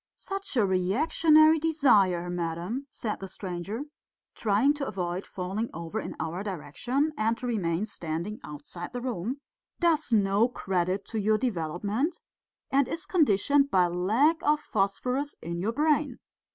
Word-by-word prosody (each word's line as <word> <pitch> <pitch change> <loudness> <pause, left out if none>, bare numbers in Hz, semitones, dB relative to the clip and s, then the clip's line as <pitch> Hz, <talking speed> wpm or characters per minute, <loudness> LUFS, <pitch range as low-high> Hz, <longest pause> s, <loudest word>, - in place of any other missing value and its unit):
"Such 390 -7 -5
a 220 - +4
reactionary 310 - +4
desire, 225 - +3
madam," 175 +9 -3
said 225 -4 -4
the 195 - -6
stranger, 190 +5 -5 0.5
trying 225 +7 +2
to 290 -2 -4
avoid 180 -1 -3
falling 195 +5 -3
over 165 -1 -4
in - - -6
our 165 +3 -3
direction 215 - -2
and 225 -2 +1
to 250 - -7
remain 195 -5 0
standing 175 +3 -4
outside 170 +4 -8
the 245 - -4
room, 245 +2 -3 0.4
"does 320 -6 +2
no 205 +1 +4
credit 190 -3 -1
to 225 - -2
your 215 +1 +3
development, 210 - -1 0.5
and 275 0 +3
is 325 -1 -4
conditioned 280 - +3
by 185 -6 +4
lack 215 - +2
of 300 0 +3
phosphorus 250 +5 -1
in 170 +1 -5
your 205 +6 0
brain. 295 0 +1
215 Hz, 140 wpm, -28 LUFS, 180-280 Hz, 0.5 s, a